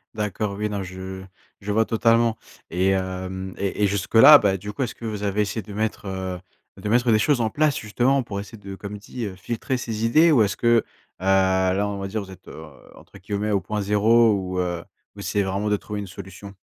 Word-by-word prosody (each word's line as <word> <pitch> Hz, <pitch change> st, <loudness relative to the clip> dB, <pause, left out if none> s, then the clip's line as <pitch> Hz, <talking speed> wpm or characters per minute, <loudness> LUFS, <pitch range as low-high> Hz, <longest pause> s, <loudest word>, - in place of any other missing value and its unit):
D'accord, 105 Hz, -1 st, -2 dB
oui 105 Hz, +1 st, -2 dB
non, 100 Hz, -2 st, -3 dB
je 95 Hz, +1 st, -7 dB, 0.4 s
je 100 Hz, +1 st, -4 dB
vois 110 Hz, +2 st, +3 dB
totalement 115 Hz, 0 st, +2 dB, 0.3 s
et 90 Hz, +2 st, +1 dB
hem, 95 Hz, 0 st, -3 dB
et 100 Hz, +1 st, -2 dB
et -, -, +5 dB
jusque 100 Hz, +2 st, -3 dB
là, 145 Hz, +7 st, +10 dB
bah, 100 Hz, -5 st, +1 dB
du 105 Hz, +3 st, -7 dB
coup, 105 Hz, -, -2 dB
est-ce 120 Hz, -, -4 dB
que 115 Hz, -, -9 dB
vous 105 Hz, -2 st, -4 dB
avez 100 Hz, +1 st, 0 dB
essayé 105 Hz, +2 st, -2 dB
de 100 Hz, +1 st, -11 dB
mettre, 110 Hz, +1 st, -2 dB
heu, 95 Hz, -1 st, -4 dB, 0.4 s
de 105 Hz, -, -3 dB
mettre 120 Hz, +1 st, +3 dB
des 110 Hz, -, +4 dB
choses 135 Hz, +2 st, +2 dB
en 110 Hz, -, +1 dB
place, 150 Hz, +2 st, +1 dB
justement, 125 Hz, +5 st, +1 dB
pour 100 Hz, -4 st, -5 dB
essayer 105 Hz, +3 st, -9 dB
de 100 Hz, -1 st, -9 dB
comme 100 Hz, +1 st, -7 dB
dit, 115 Hz, +3 st, -6 dB
heu: 95 Hz, -3 st, -6 dB
«filtrer 115 Hz, +7 st, -3 dB
ces 115 Hz, -2 st, -3 dB
idées»? 155 Hz, +8 st, +5 dB
Ou 125 Hz, -7 st, +5 dB
est-ce 100 Hz, 0 st, -1 dB
que, 120 Hz, -, -1 dB
heu, -, -, +1 dB, 0.4 s
là, 95 Hz, +1 st, +2 dB
on 100 Hz, -1 st, -4 dB
va 95 Hz, -, -4 dB
dire, 105 Hz, +2 st, -3 dB
vous 95 Hz, -, -12 dB
êtes, 95 Hz, 0 st, -15 dB
heu, 80 Hz, -, -9 dB, 0.3 s
entre -, -, -16 dB
guillemets 105 Hz, +2 st, -3 dB
«au 100 Hz, -, +2 dB
point 105 Hz, +4 st, -3 dB
zéro» 110 Hz, +3 st, +4 dB
ou 95 Hz, -2 st, -2 dB
heu, 85 Hz, -1 st, -2 dB, 0.3 s
vous -, -, -9 dB
essayez 100 Hz, -, 0 dB
vraiment 100 Hz, +2 st, -2 dB
de 105 Hz, -, +2 dB
trouver 105 Hz, +1 st, -6 dB
une 100 Hz, -, -5 dB
solution? 100 Hz, +1 st, -10 dB
105 Hz, 235 wpm, -23 LUFS, 95-110 Hz, 0.4 s, là